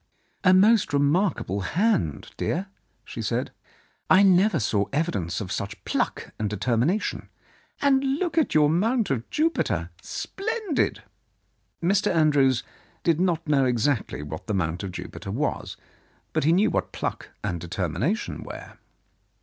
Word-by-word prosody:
"A 185 Hz, -, +6 dB
most 205 Hz, 0 st, +5 dB
remarkable 145 Hz, -, +1 dB
hand, 95 Hz, -, 0 dB
dear," 180 Hz, +4 st, -1 dB, 0.4 s
she -, -, -6 dB
said. -, -, -1 dB, 0.6 s
"I 190 Hz, +2 st, +7 dB
never 190 Hz, -2 st, +4 dB
saw 105 Hz, -2 st, +1 dB
evidence 135 Hz, -, -1 dB
of 95 Hz, -3 st, -5 dB
such 100 Hz, +2 st, -5 dB
pluck -, -, -2 dB
and 105 Hz, -1 st, -1 dB
determination. 120 Hz, -, 0 dB, 0.5 s
And 275 Hz, -1 st, +4 dB
look 350 Hz, 0 st, -2 dB
at 320 Hz, -, +2 dB
your 150 Hz, -1 st, +6 dB
Mount 215 Hz, -, +1 dB
of 120 Hz, -3 st, -2 dB
Jupiter! 325 Hz, +2 st, 0 dB
Splendid! 425 Hz, -, -2 dB, 0.4 s
" -, -, -27 dB
Mr. 200 Hz, +4 st, +2 dB
Andrews 145 Hz, -6 st, +3 dB, 0.4 s
did 165 Hz, -2 st, +2 dB
not 170 Hz, -3 st, 0 dB
know 140 Hz, -3 st, +3 dB
exactly 125 Hz, -, 0 dB
what 80 Hz, +1 st, -7 dB
the 105 Hz, -, -1 dB
Mount 85 Hz, -2 st, -1 dB
of 100 Hz, -2 st, -5 dB
Jupiter 95 Hz, -, -7 dB
was, 135 Hz, +9 st, -2 dB, 0.6 s
but -, -, +1 dB
he 160 Hz, -, +5 dB
knew 195 Hz, +6 st, +3 dB
what -, -, -1 dB
pluck -, -, -4 dB
and 85 Hz, -, -2 dB
deter 90 Hz, +2 st, -2 dB
mination 170 Hz, -, -2 dB
were. -, -, -10 dB
155 Hz, 140 wpm, -25 LUFS, -, 0.6 s, I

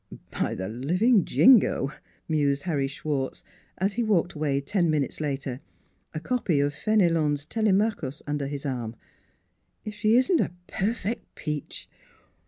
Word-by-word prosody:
By -, -, -1 dB
the 95 Hz, 0 st, -4 dB
living 180 Hz, -, +2 dB
Jingo! 225 Hz, -, +5 dB, 0.2 s
" -, -, -36 dB
mused 145 Hz, -3 st, +1 dB
Harry 145 Hz, -6 st, 0 dB
Schwartz, 135 Hz, -1 st, -3 dB, 0.3 s
as 195 Hz, +2 st, 0 dB
he 240 Hz, +3 st, 0 dB
walked 195 Hz, -6 st, +1 dB
away 150 Hz, -3 st, 0 dB
ten 170 Hz, +5 st, 0 dB
minutes 150 Hz, -1 st, -1 dB
later, 135 Hz, -3 st, -3 dB, 0.5 s
a 155 Hz, -, -4 dB
copy 185 Hz, -, 0 dB
of 145 Hz, +1 st, +1 dB
Fenelon's 165 Hz, -7 st, +1 dB
Telemachus 200 Hz, -, 0 dB
under 145 Hz, -1 st, -2 dB
his 140 Hz, 0 st, -5 dB
arm, 120 Hz, -4 st, -3 dB, 0.5 s
" -, -, -46 dB
if 215 Hz, -, -5 dB
she 215 Hz, +2 st, +2 dB
isn't 260 Hz, +7 st, +4 dB
a -, -, -2 dB
perfect 220 Hz, +3 st, -3 dB
peach 150 Hz, -2 st, -5 dB
155 Hz, 145 wpm, -26 LUFS, 140-210 Hz, 0.5 s, Jingo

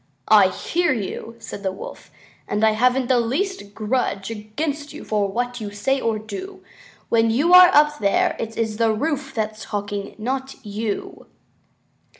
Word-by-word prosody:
"I 210 Hz, -3 st, +7 dB
hear 345 Hz, -, 0 dB
you," 225 Hz, +1 st, -5 dB
said 215 Hz, -3 st, -8 dB
the 190 Hz, -1 st, -1 dB
Wolf, 190 Hz, -, -10 dB, 0.4 s
"and 210 Hz, +2 st, +1 dB
I 220 Hz, -, +5 dB
haven't 250 Hz, +4 st, +2 dB
the 245 Hz, 0 st, +3 dB
least 245 Hz, -, -2 dB
grudge 215 Hz, -3 st, -1 dB
against 285 Hz, +8 st, -4 dB
you -, -, -9 dB
for 210 Hz, -2 st, 0 dB
what 245 Hz, +2 st, -2 dB
you 210 Hz, -, -4 dB
say 265 Hz, +7 st, -1 dB
or 225 Hz, -1 st, 0 dB
do. 220 Hz, -, -8 dB, 0.5 s
When 230 Hz, -1 st, +3 dB
you 290 Hz, +10 st, +2 dB
are 360 Hz, 0 st, +10 dB
up 300 Hz, -1 st, +4 dB
there 200 Hz, -1 st, +2 dB
it 225 Hz, 0 st, -5 dB
is 220 Hz, -2 st, -1 dB
the 225 Hz, -1 st, +3 dB
roof 275 Hz, +4 st, -2 dB
that's 215 Hz, -1 st, -3 dB
talking, 205 Hz, -1 st, -4 dB
not 265 Hz, +4 st, -3 dB
you." 210 Hz, 0 st, -4 dB
225 Hz, 160 wpm, -22 LUFS, 210-270 Hz, 0.5 s, are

